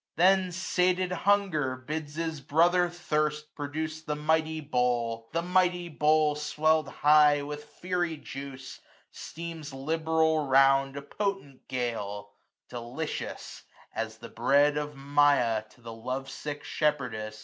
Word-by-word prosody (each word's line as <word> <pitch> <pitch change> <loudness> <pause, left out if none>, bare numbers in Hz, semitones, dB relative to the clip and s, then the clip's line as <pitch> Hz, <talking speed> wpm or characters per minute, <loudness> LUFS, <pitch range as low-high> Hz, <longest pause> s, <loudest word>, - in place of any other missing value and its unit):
Then 185 +1 +4
sated 185 0 +1
Hunger 180 -7 +1
bids 150 +3 -6
his 160 -2 -3
brother 175 +5 +3
Thirst 150 -3 -2
Produce 155 +2 -4
the 150 -1 -3
mighty 160 +1 +1
bowl; 120 -5 -1
the 170 0 -1
mighty 180 -1 +1
bowl, 155 0 +3
Sweird 155 +1 +1
high 150 -1 +4
with 150 +1 -6
fiery 175 +1 -2
juice, 135 -2 -8 0.3
steams 165 -4 -7
liberal 160 +1 +1
round 135 +1 +4
A 140 - -6
potent 195 -7 -4
gale 105 -5 -3 0.4
J 125 - -5
delicious, 125 +7 -5 0.3
as 110 0 -4
the 115 +1 -10
breath 140 +5 +3
$1$ - - -4
Of 150 0 -3
Maia 140 -5 +3
to 120 - -22
the 115 -1 -8
love 130 +4 -5
sick 145 +1 -6
shepherdess. 120 -8 -2
150 Hz, 130 wpm, -28 LUFS, 135-160 Hz, 0.4 s, Then